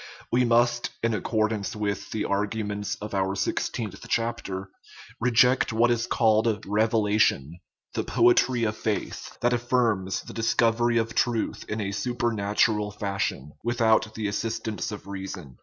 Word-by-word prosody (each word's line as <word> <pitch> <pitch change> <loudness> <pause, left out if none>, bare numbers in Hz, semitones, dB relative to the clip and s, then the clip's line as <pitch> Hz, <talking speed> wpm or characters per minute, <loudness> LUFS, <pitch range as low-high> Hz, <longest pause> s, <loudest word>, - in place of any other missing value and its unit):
We 125 +1 +3
must, 120 0 +2
in 115 0 +2
accordance 110 -1 -1
with 105 -1 -3
the 110 - -2
argu 105 +2 -1
ments 105 0 -3
of 105 0 -8
our 95 0 0
sixteenth 100 0 -2
chapter, 95 -5 -2 0.5
reject 125 +1 +4
what 115 +2 +3
is 120 0 0
called 110 -1 +2
" - - -14
revelation," 105 - +2 0.3
the - - -1
poetry 120 +1 +3
of 110 -1 0
faith, 110 -1 -4
that 120 +1 +2
affirms 120 -6 0
the - - -10
dis 115 0 0
covery 120 0 +3
of 115 0 -2
truth 120 -3 0
in 105 - -2
a 100 -2 -2
supernatural 105 -2 0
fashion, 100 -8 -3
without 110 -2 +2
the 110 -2 -2
assistance 110 -2 -3
of 105 - -7
reason. 95 -8 -7
110 Hz, 145 wpm, -26 LUFS, 100-115 Hz, 0.5 s, reject